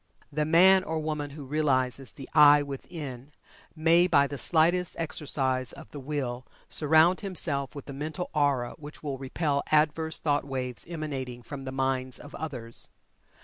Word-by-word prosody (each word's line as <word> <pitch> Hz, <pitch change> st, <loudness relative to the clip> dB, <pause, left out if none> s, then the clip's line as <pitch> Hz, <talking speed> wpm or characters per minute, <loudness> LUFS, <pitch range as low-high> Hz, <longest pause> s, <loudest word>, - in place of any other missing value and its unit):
The 150 Hz, +1 st, 0 dB
man 185 Hz, +4 st, +6 dB
or 160 Hz, -3 st, -3 dB
woman 155 Hz, -2 st, -3 dB
who 140 Hz, 0 st, -9 dB
realizes 135 Hz, -3 st, 0 dB
the 135 Hz, -, -11 dB
"I" 145 Hz, -1 st, +7 dB
within, 140 Hz, -1 st, -7 dB, 0.4 s
may 165 Hz, +2 st, +4 dB
by 140 Hz, -5 st, +4 dB
the 145 Hz, -, -5 dB
slightest 175 Hz, +2 st, +3 dB
exercise 135 Hz, -5 st, -1 dB
of -, -, -12 dB
the 145 Hz, -, -7 dB
Will 130 Hz, -3 st, -3 dB, 0.2 s
surround 160 Hz, +4 st, +4 dB
himself 155 Hz, -8 st, -2 dB
with 140 Hz, -, -8 dB
a 140 Hz, -, -6 dB
mental 155 Hz, +5 st, -5 dB
aura 140 Hz, -5 st, +1 dB
which 150 Hz, +1 st, -10 dB
will 140 Hz, -3 st, -4 dB
repel 140 Hz, +1 st, -1 dB
adverse 155 Hz, +1 st, +2 dB
thought 145 Hz, -2 st, 0 dB
waves 130 Hz, -3 st, -4 dB
emanating 135 Hz, -7 st, -5 dB
from 135 Hz, +1 st, -8 dB
the 130 Hz, -, -4 dB
minds 130 Hz, -1 st, -1 dB
of 145 Hz, -, -12 dB
others. 125 Hz, -7 st, -6 dB
145 Hz, 155 wpm, -28 LUFS, 135-155 Hz, 0.4 s, I